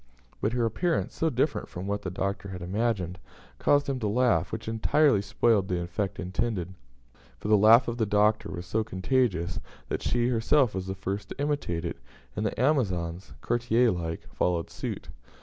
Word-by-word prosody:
But 105 - 0
her 120 -1 +1
appearance 170 +9 0
so 160 - +1
different 140 +2 -1
from 90 +2 -6
what 100 +1 -2
the 95 - -4
Doctor 100 +2 -3
had 90 -2 -6
imagined 95 -2 -1 0.4
caused 145 0 +3
him 135 -2 -1
to 110 - -1
laugh, 125 +3 +2
which 110 0 -5
entirely 115 +2 +3
spoiled 100 0 +2
the 90 -2 -1
effect 90 +2 -3
intended; 95 -1 -2 0.6
for 105 - -5
the 110 - +7
laugh 110 +5 +7
of 120 0 -2
the 110 - +1
Doctor 105 +1 +2
was 90 -1 -6
so 110 +5 0
contagious, 95 -4 0 0.3
that - - -2
she 120 0 +1
herself 125 +1 +3
was 95 0 -4
the 95 - -3
first 100 +1 -4
to - - -8
imitate 140 - -1
it, 85 - -4 0.4
and 110 - 0
the - - -5
Amazons, 95 - 0
courtier 120 0 +2
like, 80 -2 -4
followed 85 -2 0
suit. - - -5
105 Hz, 180 wpm, -28 LUFS, 95-120 Hz, 0.6 s, the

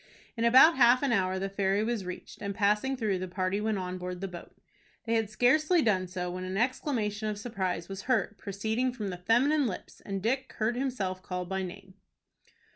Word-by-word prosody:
In 230 -1 0
about 260 +7 +7
half 250 +1 +6
an 275 - +2
hour 190 -4 +1
the 195 +1 -2
ferry 195 +1 0
was 225 -4 -2
reached, 180 0 -8
and, 200 -1 -3
passing 210 +6 +1
through, 210 -6 0
the 185 - -4
party 185 +2 -1
went 215 -1 0
on 185 0 -4
board 180 0 -5
the 195 - -3
boat. 175 -2 -10 0.5
They 230 - 0
had 225 -2 +1
scarcely 305 +9 +3
done 190 -4 +2
so, 180 0 -4
when 185 +1 -5
an 185 +1 -3
exclamation 220 -3 -1
of 210 - -3
surprise 190 -6 -3
was 195 -1 -6
heard, 220 -3 +1
proceeding 220 +6 -1
from 205 -6 -4
feminine 250 +10 +2
lips, 195 - -7
and 195 -1 -3
Dick 260 +6 -1
heard 220 +2 0
himself 245 -8 -2
called 180 -1 -4
by 190 0 -1
name. 190 +1 -8
205 Hz, 200 wpm, -29 LUFS, 185-240 Hz, 0.5 s, about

